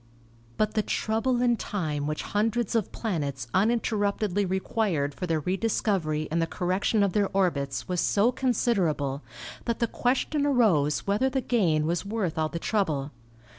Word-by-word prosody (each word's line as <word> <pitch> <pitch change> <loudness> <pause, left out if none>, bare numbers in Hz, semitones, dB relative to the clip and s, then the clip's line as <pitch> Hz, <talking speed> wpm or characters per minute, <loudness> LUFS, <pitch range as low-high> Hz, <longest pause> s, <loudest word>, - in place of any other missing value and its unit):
But 215 0 +1
the 215 - +2
trouble 235 +4 0
and 240 -2 +2
time 150 -8 -2
which 155 0 -2
hundreds 225 +2 0
of 225 -4 0
planets 145 - -3
un 200 +4 +4
interruptedly 205 -3 0
required 190 -6 0
for 180 - -5
their 160 -2 0
rediscovery 180 -4 0
and 165 +1 +1
the 165 - +1
cor 175 +2 -3
rection 200 +3 +2
of 190 - -2
their 205 -2 +2
orbits 140 -9 0
was 180 -2 0
so 215 +4 +3
considerable 190 - 0 0.4
that 235 - -1
the 235 - +1
ques 245 +3 0
tion 300 -2 +1
arose 190 - +2
whether 210 +7 +2
the 265 0 0
gain 175 -12 +1
was 170 +1 0
worth 200 -6 -2
all 155 0 +1
the 170 - -4
trouble. 160 -8 -1
195 Hz, 170 wpm, -27 LUFS, 155-225 Hz, 0.4 s, un